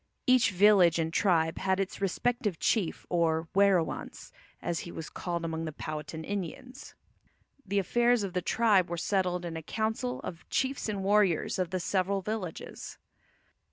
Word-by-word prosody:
Each 255 Hz, -3 st, +5 dB
village 190 Hz, -3 st, +5 dB
and 165 Hz, 0 st, -1 dB
tribe 165 Hz, -5 st, +2 dB
had 190 Hz, 0 st, +1 dB
its 195 Hz, 0 st, -3 dB
respective 210 Hz, 0 st, 0 dB
chief, 195 Hz, -3 st, 0 dB
or 165 Hz, -2 st, +1 dB
"werowance," 195 Hz, -4 st, +1 dB, 0.3 s
as 170 Hz, -1 st, -2 dB
he 175 Hz, -, -7 dB
was 160 Hz, -, -7 dB
called 170 Hz, -2 st, -3 dB
among 165 Hz, 0 st, -3 dB
the 155 Hz, -, -4 dB
Powhatan 155 Hz, +1 st, -6 dB
Indians. 205 Hz, -, -6 dB, 0.7 s
The 200 Hz, +2 st, -1 dB
affairs 240 Hz, +4 st, +2 dB
of 190 Hz, -3 st, -4 dB
the 180 Hz, -, 0 dB
tribe 205 Hz, -4 st, +3 dB
were 170 Hz, -, -3 dB
settled 180 Hz, -1 st, 0 dB
in 165 Hz, -1 st, -5 dB
a 160 Hz, -, -4 dB
council 220 Hz, -, -2 dB
of 165 Hz, -, -6 dB
the -, -, -24 dB
chiefs 265 Hz, -3 st, -1 dB
and 200 Hz, -2 st, -3 dB
warriors 195 Hz, -3 st, +2 dB
of 180 Hz, -2 st, 0 dB
the 185 Hz, -, -2 dB
several 190 Hz, +2 st, 0 dB
villages. 205 Hz, -5 st, -5 dB
185 Hz, 160 wpm, -29 LUFS, 170-210 Hz, 0.7 s, Each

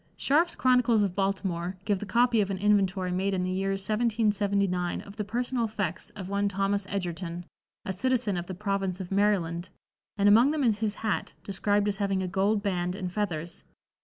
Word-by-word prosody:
Scharf's 330 Hz, +5 st, +2 dB
"Chronicles 250 Hz, -4 st, +3 dB
of 195 Hz, -3 st, -1 dB
Baltimore" 190 Hz, -2 st, -1 dB
give 205 Hz, -3 st, +1 dB
the 210 Hz, -, -6 dB
copy 235 Hz, 0 st, +3 dB
of 200 Hz, -, -1 dB
an 195 Hz, -, -2 dB
inventory 195 Hz, -2 st, +2 dB
made 190 Hz, +2 st, 0 dB
in 180 Hz, -, -1 dB
the 185 Hz, -, -1 dB
year 195 Hz, +1 st, -1 dB
1779 200 Hz, -3 st, 0 dB
of 200 Hz, -, -12 dB
the 215 Hz, -, -2 dB
personal 240 Hz, +3 st, -1 dB
effects 205 Hz, -6 st, -3 dB
of 195 Hz, -3 st, -6 dB
one 200 Hz, +1 st, 0 dB
Thos. 195 Hz, +1 st, 0 dB
Edgerton, 175 Hz, -2 st, -4 dB, 0.4 s
a 190 Hz, -, -2 dB
citizen 245 Hz, -1 st, 0 dB
of 175 Hz, 0 st, -4 dB
the 185 Hz, -, -5 dB
Province 195 Hz, -1 st, -2 dB
of 185 Hz, -1 st, -6 dB
Maryland, 190 Hz, -4 st, +1 dB, 0.5 s
and 200 Hz, 0 st, +3 dB
among 225 Hz, +6 st, +6 dB
them 300 Hz, -1 st, 0 dB
is 220 Hz, -4 st, +2 dB
his 215 Hz, -2 st, -1 dB
hat, 220 Hz, -2 st, -2 dB
described 205 Hz, +1 st, 0 dB
as 200 Hz, -1 st, 0 dB
having 195 Hz, -2 st, 0 dB
a -, -, -2 dB
gold 200 Hz, +3 st, +1 dB
band 180 Hz, -3 st, -1 dB
and 185 Hz, -3 st, -4 dB
feathers. 175 Hz, -5 st, -3 dB
200 Hz, 190 wpm, -28 LUFS, 185-210 Hz, 0.5 s, among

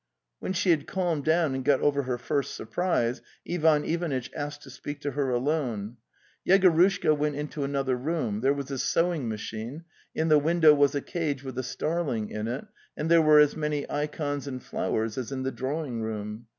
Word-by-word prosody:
When -, -, -3 dB
she 190 Hz, -1 st, +2 dB
had 155 Hz, -4 st, +1 dB
calmed 175 Hz, -6 st, -1 dB
down 160 Hz, -2 st, +2 dB
and 130 Hz, 0 st, -3 dB
got 140 Hz, -1 st, +3 dB
over 140 Hz, -1 st, +2 dB
her 125 Hz, -2 st, -2 dB
first 140 Hz, +2 st, -2 dB
surprise 125 Hz, -3 st, -1 dB, 0.3 s
Ivan 160 Hz, -3 st, +3 dB
Ivanitch 160 Hz, -7 st, -2 dB
asked 145 Hz, 0 st, -5 dB
to 135 Hz, -, -11 dB
speak 145 Hz, +3 st, -7 dB
to 145 Hz, -, -2 dB
her 140 Hz, 0 st, -1 dB
alone. 120 Hz, -4 st, -1 dB, 0.5 s
Yegorushka 185 Hz, -3 st, +4 dB
went 150 Hz, 0 st, -1 dB
into 150 Hz, 0 st, -4 dB
another 135 Hz, -2 st, 0 dB
room; 125 Hz, -6 st, -2 dB
there 135 Hz, +2 st, +3 dB
was 140 Hz, -1 st, -3 dB
a 135 Hz, -, -3 dB
sewing 165 Hz, -7 st, +1 dB
machine; 110 Hz, +7 st, -5 dB, 0.3 s
in 160 Hz, -, +1 dB
the 155 Hz, -2 st, +6 dB
window 160 Hz, 0 st, +5 dB
was 145 Hz, -1 st, +3 dB
a 140 Hz, -, 0 dB
cage 150 Hz, -5 st, -3 dB
with 130 Hz, -2 st, -5 dB
a -, -, -2 dB
starling 135 Hz, -5 st, -2 dB
in 105 Hz, +1 st, -3 dB
it, 125 Hz, -, -4 dB, 0.3 s
and 155 Hz, +2 st, -2 dB
there 170 Hz, -1 st, +7 dB
were 155 Hz, -1 st, +6 dB
as 150 Hz, -1 st, +5 dB
many 150 Hz, -2 st, -2 dB
ikons 145 Hz, -1 st, -2 dB
and 130 Hz, -2 st, -5 dB
flowers 110 Hz, +2 st, -2 dB
as 130 Hz, +1 st, -5 dB
in 130 Hz, -1 st, -3 dB
the 135 Hz, -, -1 dB
drawing 130 Hz, -3 st, -3 dB
room. 110 Hz, +1 st, -5 dB
145 Hz, 190 wpm, -27 LUFS, 130-155 Hz, 0.5 s, there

